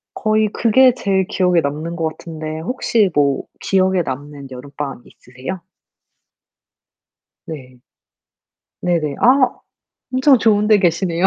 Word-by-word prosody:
거의 215 0 +1
그게 250 +2 +4
제일 190 -5 0
기억에 180 -2 +2
남는 155 +4 -4
거 165 -2 -1
같은데 155 -1 -7
혹시 215 0 0
뭐 140 -2 +1 0.2
기억에 190 -1 +2
남는 145 0 -7
여름방학이 135 0 -7
있으세요? 130 +9 -7 1.9
네. 130 -5 -9 1.1
네네. 160 -5 -1
아 255 +1 +5 0.6
엄청 260 +1 +4
좋은데 210 -1 +3
계시네요. 175 0 +1
175 Hz, 240 characters per minute, -18 LUFS, 145-210 Hz, 1.9 s, 아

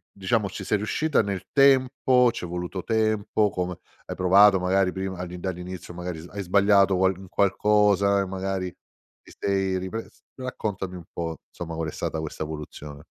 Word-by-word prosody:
diciamo 100 +2 0
ci - - -7
sei 105 - +1
riuscita 145 +8 +1
nel 100 -2 -4
tempo, 130 -2 +4
c'è 90 - -6
voluto 90 +2 -4
tempo, 110 -1 +1
come 90 -1 -3 0.3
hai - - -6
provato 95 +1 +6
magari 90 0 +2
prima 95 -1 -4
al 90 0 -5
dall'inizio 90 -1 -6
magari 90 -2 -5
hai 100 -1 -5
sbagliato 100 +1 +4
qualc 95 0 +2
un 95 -1 -12
qualcosa 100 0 +3
e - - -1
magari 95 0 -3 0.5
ti - - -16
sei 95 -1 0
ripres 95 +5 -6 0.2
raccontami 105 -8 -4
un 85 - -11
po' 85 -1 -4
insomma 85 -1 -7
qual 80 -1 -2
è - - -7
stata 80 - -3
questa 80 0 -5
evoluzione. 75 -1 -8
95 Hz, 165 wpm, -25 LUFS, 90-105 Hz, 0.5 s, provato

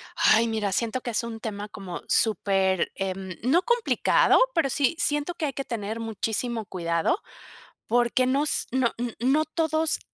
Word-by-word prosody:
Ay, 230 +1 +4
mira, 215 -3 -1
siento 235 +5 0
que 240 - -4
es 230 - 0
un 225 -1 -6
tema 210 -2 -5
como 190 -5 -7
súper, 195 -3 +1
em, 190 -1 -4
no 300 +9 +3
complicado, 475 -1 +3
pero 305 -5 +1
sí 285 +4 +1
siento 295 +1 0
que 315 - -2
hay 275 - -3
que 275 - -4
tener 220 -1 -4
muchísimo 225 +1 -2
cuidado, 170 - -1 0.7
porque 240 +2 +2
nos 280 +3 +1
no 255 -2 +1
n 240 -1 -4
no 275 +6 +2
todos 315 0 0
235 Hz, 160 wpm, -25 LUFS, 205-280 Hz, 0.7 s, Ay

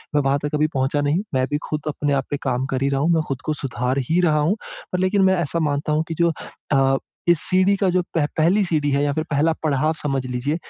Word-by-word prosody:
मैं 145 - +4
वहाँ 135 0 +2
तक 145 - -3
अभी 155 +1 +2
पहुँचा 135 +2 0
नहीं। 145 +5 +1
मैं 130 - +2
अभी 135 +3 0
खुद 150 -1 -2
अपने 145 -1 -1
आप 135 -1 0
पे 145 - 0
काम 130 -1 0
कर 130 0 -1
ही 140 - +2
रहा 135 -1 0
हूँ। 160 - +2
मैं 160 - +3
खुद 135 -2 -4
को 155 - 0
सुधार 130 -2 -2
ही 170 +3 +3
रहा 155 -4 +3
हूँ। 160 +8 +2 0.4
पर 180 - 0
लेकिन 185 +2 +2
मैं 190 0 +4
ऐसा 170 +1 -1
मानता 150 -1 -1
हूँ 155 - +1
कि 165 - -3
जो 170 -1 +4 0.4
अ, 135 0 +3 0.3
इस 175 -2 +5
सीढ़ी 185 +2 +4
का 195 -1 +1
जो 180 0 +2
पह 160 -3 +3
पहली 180 +6 +3
सीढ़ी 155 -4 0
है 140 +1 +2
या 145 - +1
फिर 155 +2 -1
पहला 155 +3 +2
पड़ाव 155 +1 +1
समझ 135 -3 -1
लीजिए। 125 +4 -2
150 Hz, 265 wpm, -22 LUFS, 135-165 Hz, 0.4 s, इस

